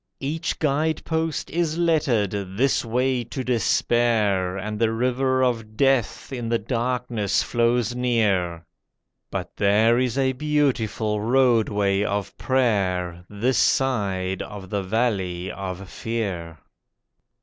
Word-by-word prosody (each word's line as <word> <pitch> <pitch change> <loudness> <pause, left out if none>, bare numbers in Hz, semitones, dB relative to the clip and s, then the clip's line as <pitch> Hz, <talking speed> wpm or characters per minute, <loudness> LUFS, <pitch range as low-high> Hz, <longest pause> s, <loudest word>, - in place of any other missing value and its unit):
Each 155 +4 -2
guide 155 +2 0
post 160 -1 -2
is 165 -1 0
lettered, 150 - +2
'This 100 +7 0
way 125 +2 0
to 130 +3 -5
Despair,' 115 -6 +1
And 105 +2 -4
the 115 -1 +2
River 130 +3 +1
of 115 -4 -1
Death 135 -2 +1
in 120 -3 -3
the 115 - +2
darkness 120 -2 -1
flows 120 0 +1
near, 100 -9 0 0.6
But - - -5
there 110 +4 +4
is 125 -1 0
a 135 -1 +2
beautiful 125 -7 0
Roadway 110 -5 +2
of 100 -1 -2
Prayer 95 -9 0
This 115 +6 0
side 95 -8 +1
of 95 -3 -8
the 100 -1 0
Valley 95 -4 -1
of 95 0 -6
Fear. 95 -8 -4
115 Hz, 115 wpm, -24 LUFS, 100-130 Hz, 0.6 s, there